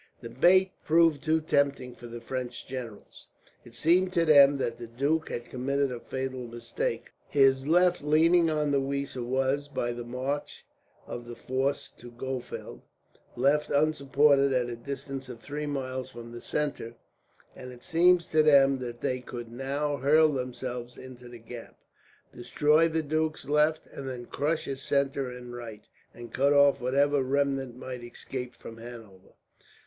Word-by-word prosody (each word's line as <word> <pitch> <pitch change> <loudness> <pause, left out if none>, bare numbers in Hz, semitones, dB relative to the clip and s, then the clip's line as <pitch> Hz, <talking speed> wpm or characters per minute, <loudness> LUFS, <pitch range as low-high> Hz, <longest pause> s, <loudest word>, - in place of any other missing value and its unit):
The 115 -2 -8
bait 185 +9 +4
proved 160 -2 +3
too 160 0 +2
tempting 140 -4 0
for 120 - -11
the 120 0 -8
French 125 0 -5
generals. 125 -5 -9 0.4
It 120 - -15
seemed 175 +8 +3
to 170 -2 +2
them 140 -2 +7
that 120 -3 -3
the 120 - -7
duke 140 +7 -1
had 120 - -5
committed 140 +2 -1
a 120 - -5
fatal 130 -1 -5
mistake. 120 - -4 0.2
His 135 -1 +3
left, 180 +2 +4
leaning 165 +3 +4
on 150 -2 0
the 140 -1 +2
Weser 140 -1 -3
was, 135 +3 0
by 120 -4 -2
the 120 0 -6
march 130 +4 -4 0.4
of 120 0 -7
the 120 - -7
force 135 +3 -2
to 120 - -11
Gohfeld, 120 - -6 0.5
left 140 +4 +2
unsupported 140 -1 +3
at 125 -1 0
a - - -4
distance 135 +1 -6
of 120 -2 -8
three 150 +5 -5
miles 130 -2 -4
from 120 -2 -10
the 120 0 -9
centre; 145 -6 -3 0.6
and 125 0 -9
it 125 -1 -14
seemed 175 +1 +4
to 155 - +5
them 140 -3 +5
that 120 -1 -7
they 130 0 -1
could 120 -2 -8
now 140 +4 -2
hurl 155 +4 +4
themselves 125 -2 -5
into 125 -1 -11
the 120 - -10
gap, 115 +1 -11 0.6
destroy 150 +6 +2
the 160 0 -1
duke's 155 -1 -2
left, 150 +2 +2
and 135 -1 -8
then 125 -2 -6
crush 155 +5 -1
his 135 -1 -5
centre 140 -1 0
and 125 -1 -9
right, 115 -3 -8 0.3
and 120 -1 -11
cut 140 +2 +3
off 140 -2 +5
whatever 140 +3 +2
remnant 135 -1 0
might 125 -1 -7
escape 125 +1 -7
from 115 - -11
Hanover. 115 -5 -12
135 Hz, 165 wpm, -28 LUFS, 120-145 Hz, 0.6 s, them